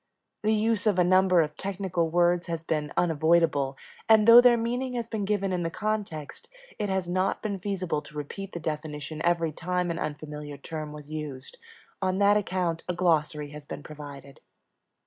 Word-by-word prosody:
The 215 +1 +2
use 220 0 +1
of 205 -3 +3
a 180 - +5
number 185 0 +5
of 150 -1 -2
technical 190 -4 -2
words 175 +1 +2
has 165 -1 -3
been 150 -2 -2
unavoidable, 160 -4 +2 0.3
and, 220 -1 +6
though 235 +1 +11
their 245 -1 +6
meaning 245 +3 -2
has 235 -2 -3
been 220 -3 -3
given 200 -2 0
in 180 - -1
the 165 - -1
context, 200 -7 -4 0.3
it 205 -1 -1
has 190 -2 -1
not 185 +2 0
been 200 -3 -2
feasible 185 -5 -2
to 150 0 -12
repeat 195 +7 -6
the 170 - -4
definition 155 -1 -5
every 170 -2 +2
time 180 +2 -2
an 170 - -4
unfamiliar 150 -1 -5
term 155 -1 -6
was 150 -1 -10
used. 145 -4 -6 0.4
On 185 0 0
that 200 +1 +5
account 180 -5 -1
a 180 - 0
glossary 155 -4 +1
has 150 0 -9
been 145 - -7
provided. 145 -2 -10
175 Hz, 180 wpm, -27 LUFS, 150-195 Hz, 0.4 s, though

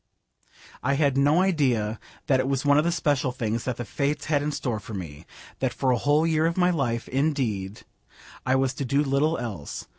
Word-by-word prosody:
I 140 - +1
had 140 -2 +2
no 145 +5 +4
idea 125 - +1 0.3
that 135 -3 +3
it 130 - 0
was 135 0 -1
one 145 +1 +5
of - - +2
the 170 - +1
special 145 -6 0
things 115 -2 -3
that 125 -2 -2
the 120 - -4
Fates 140 +5 -2
had 150 -2 +1
in 150 +1 -1
store 120 -6 -2
for 110 0 -8
me: 80 -4 -8 0.3
that 130 -2 -1
for 130 -2 +1
a 125 - +2
whole 150 +2 +3
year 160 -1 +2
of 170 - -2
my 180 0 +4
life, 120 -8 -1
indeed, 125 -9 -1 0.6
I 130 +1 +2
was 135 0 +1
to 140 - -4
do 140 +3 +1
little 145 +3 +1
else. 100 -12 -6
135 Hz, 210 wpm, -25 LUFS, 120-150 Hz, 0.6 s, one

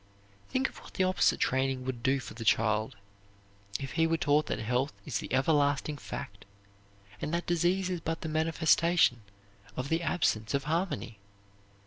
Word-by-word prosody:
Think 265 +1 +1
of - - -12
what - - -15
the 190 - +2
opposite 185 0 +2
training 130 0 0
would 130 -3 -4
do 135 +2 +2
for - - -8
the 115 - -7
child; 110 +2 +2 0.8
if 135 -1 -5
he 165 0 +2
were 165 0 +1
taught 150 0 +2
that - - -1
health 125 +6 -1
is 115 -9 -2
the - - -7
ever 135 +4 +2
lasting 145 0 +1
fact - - -7 0.8
and - - -2
that 170 - -2
disease 175 +2 +1
is 180 -2 -3
but 165 +1 -3
the - - -4
manifestation 160 -3 +3 0.6
of 130 +2 -3
the 165 +1 +1
absence 110 -10 0
of 140 - 0
harmony! 155 - -2
145 Hz, 170 wpm, -30 LUFS, 130-165 Hz, 0.8 s, manifestation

